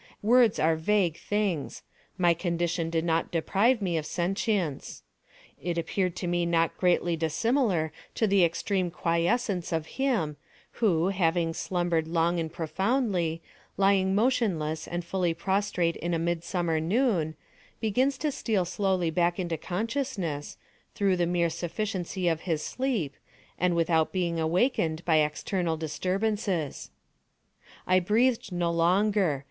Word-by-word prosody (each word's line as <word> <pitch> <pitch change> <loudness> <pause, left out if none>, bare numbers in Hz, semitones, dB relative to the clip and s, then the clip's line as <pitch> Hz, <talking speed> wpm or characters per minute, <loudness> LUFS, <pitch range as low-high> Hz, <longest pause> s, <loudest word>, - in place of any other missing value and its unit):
Words 235 0 +5
are 160 +1 +3
vague 175 0 +1
things. 205 -8 -2 0.3
My 175 -2 +4
condition 170 -1 -1
did 165 0 -1
not 165 -1 +1
deprive 205 +7 +2
me 175 -3 0
of 150 - -6
sentience. 180 - -2 0.6
It 175 -1 -2
appeared 180 +1 -1
to 180 - -4
me 175 0 +1
not 165 -1 +1
greatly 175 -2 +2
dissimilar 170 - +1 0.2
to 225 - +2
the 195 -3 +4
extreme 180 +2 0
quiescence 175 +3 0
of 160 -2 -1 0.2
him, 205 - 0 0.4
who, 180 -5 +3
having 170 -3 +1
slumbered 175 -2 -1
long 170 +1 +1
and 160 -1 -3
profoundly, 180 - -1 0.3
lying 195 -1 +3
motionless 200 -10 0
and 175 0 -4
fully 175 -2 0
prostrate 190 -2 0
in 175 0 -2
a - - +1
midsummer 170 0 -1
noon, 175 - +1 0.4
begins 255 +6 +1
to 300 +1 -1
steal 215 -8 0
slowly 185 -2 0
back 175 +1 +1
into 170 -2 -1
consciousness, 195 - -3 0.4
through 195 -2 +2
the 175 -1 +1
mere 170 -1 +1
sufficiency 185 0 -3
of 165 -1 +1
his 155 -2 0
sleep, 235 - -2 0.5
and 180 -1 +2
without 165 -1 +2
being 170 -3 -1
awakened 165 -1 +1
by 160 -2 +4
external 160 +3 0
disturbances. 185 +1 -2 1.0
I 185 0 +4
breathed 225 +4 +1
no 175 -1 0
longer. 180 -1 +2
175 Hz, 130 wpm, -28 LUFS, 165-200 Hz, 1.0 s, Words